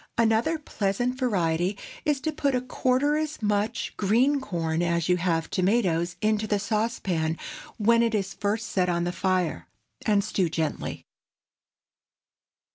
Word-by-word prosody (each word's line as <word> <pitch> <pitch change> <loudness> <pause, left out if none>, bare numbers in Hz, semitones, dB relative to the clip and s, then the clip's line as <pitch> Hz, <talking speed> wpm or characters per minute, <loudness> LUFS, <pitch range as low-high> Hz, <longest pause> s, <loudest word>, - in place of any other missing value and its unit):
Another 230 +8 +3
pleasant 245 -2 -2
variety 185 -5 +1 0.3
is 295 -2 +2
to 315 - -1
put 280 -3 0
a 250 - +1
quarter 260 +3 +1
as 310 -1 -3
much 210 +3 -1
green 245 +8 +3
corn 165 -7 -1
as 170 -1 +1
you 180 0 +3
have 165 -2 0
tomatoes 180 -3 +1
into 215 0 +1
the 205 - +1
saucepan 195 -6 -1 0.4
when 230 +1 +4
it 230 -1 +2
is 195 -2 -1
first 215 +3 -2
set 180 -2 +1
on 170 0 +1
the 175 - -1
fire, 180 - -1 0.4
and 205 -2 +3
stew 190 -4 0
gently. 160 -1 -3
205 Hz, 140 wpm, -26 LUFS, 175-235 Hz, 0.4 s, when